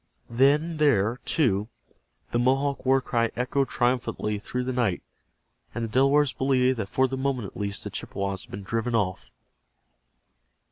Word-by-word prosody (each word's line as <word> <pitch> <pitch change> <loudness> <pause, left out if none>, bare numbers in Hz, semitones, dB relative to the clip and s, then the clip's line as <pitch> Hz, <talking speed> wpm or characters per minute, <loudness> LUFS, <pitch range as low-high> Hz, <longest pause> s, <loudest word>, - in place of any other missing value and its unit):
Then 145 +7 +3
there, 120 -7 +3
too, 105 -9 +2 0.6
the 120 - +1
Mohawk 135 +2 +1
war 135 0 +4
cry 115 -2 0
echoed 130 +2 0
triumphantly 120 -4 -1
through 125 +4 -3
the 130 +1 -2
night, 120 -8 0 0.7
and 120 - -2
the - - -6
Delawares 135 +4 +3
believed 130 -1 +2
that 100 -2 -3
for 130 0 +2
the 130 +1 -4
moment 130 -4 -1
at - - -32
least 100 0 -3
the - - -5
Chippewas 100 -1 -4
had - - -29
been 100 - -7
driven 115 +4 -1
off. 90 - -1
125 Hz, 155 wpm, -26 LUFS, 105-135 Hz, 0.7 s, war